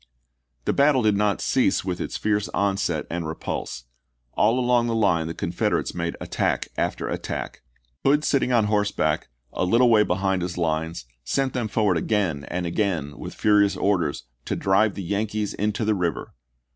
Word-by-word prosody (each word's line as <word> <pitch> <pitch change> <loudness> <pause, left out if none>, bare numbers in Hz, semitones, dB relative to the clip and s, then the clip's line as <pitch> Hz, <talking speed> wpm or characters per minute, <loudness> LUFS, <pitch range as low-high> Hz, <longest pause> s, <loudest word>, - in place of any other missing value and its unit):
The - - +1
battle 140 -3 +4
did 105 -1 +3
not 105 0 +1
cease 125 -8 +1
with 90 -2 -2
this - - -3
fierce 105 -1 0
onset 95 -6 0
and 85 -1 -3
repulse. 65 -5 -5 0.5
All 115 +4 +3
along 120 -1 +2
the 115 - 0
line 90 -7 +2
the 85 - -5
Confederates - - -1
made 85 -1 -3
attack - - -1
after - - -2
attack. - - -4 0.4
Hood 145 +2 +3
sitting 135 -4 +1
on 120 -3 +4
horseback, 105 -1 0 0.3
a - - -1
little 115 +6 +4
way 110 -2 +6
behind 95 -1 0
his 90 0 -4
lines, 80 -3 -2 0.2
sent 135 - 0
them 120 -3 -1
forward 105 -4 +1
again 85 -7 0
and 90 0 -3
again 85 -6 -1
with - - -7
furious 105 -1 +3
orders 90 -8 0
" - - -46
to - - -2
drive 100 +2 +2
the 100 - -5
Yankees 105 +2 -2
into 105 +2 -1
the 110 - +3
river." 85 -6 -2
100 Hz, 170 wpm, -24 LUFS, 85-110 Hz, 0.5 s, way